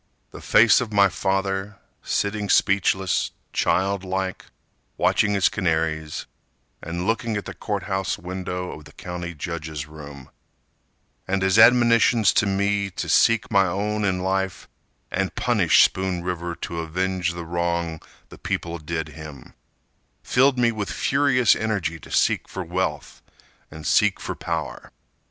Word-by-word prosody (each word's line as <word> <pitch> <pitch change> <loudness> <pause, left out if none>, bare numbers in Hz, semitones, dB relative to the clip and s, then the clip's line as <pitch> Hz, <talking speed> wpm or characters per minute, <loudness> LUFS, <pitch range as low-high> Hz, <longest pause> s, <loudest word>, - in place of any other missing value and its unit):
The - - -10
face 110 +2 +5
of 115 -3 -4
my 100 -1 +5
father, 95 +1 -2 0.2
sitting 100 0 -2
speechless, 95 -1 +2 0.2
Child 95 +3 +1
like, 95 0 -3 0.5
watching 105 -1 +2
his 95 - +4
canaries, 80 -4 -1 0.6
And 85 +2 -4
looking 115 0 -1
at 100 - -5
the - - -6
court 100 -4 -4
house 95 -2 -2
window 90 0 -5
Of 75 - -10
the 75 - -15
county 90 -1 -6
judge's 75 -2 -5
room, 75 -3 -11 1.0
And 95 0 0
his 95 +3 +3
admonitions 115 -2 +5
to 105 - +2
me 100 +1 0
to - - -5
seek 115 -1 +3
My 100 -2 +4
own 105 +4 -2
in 90 -2 0
life, 95 0 -2 0.4
and - - -2
punish - - +4
Spoon 95 -2 0
River 85 -1 -3
To 85 0 -5
avenge 90 +1 -2
the 85 -1 -6
wrong 85 -1 -2 0.3
the - - -13
people 85 0 -3
did 80 0 -4
him, 75 -3 -11 0.7
Filled 130 +1 +3
me 120 -1 +3
with 105 -3 -4
furious 130 -4 +3
energy 100 -7 -2
To - - -14
seek - - +1
for 95 - -5
wealth 85 -4 -3 0.5
and 80 0 -10
seek - - +3
for - - -4
power. - - -5
95 Hz, 140 wpm, -23 LUFS, 85-100 Hz, 1.0 s, face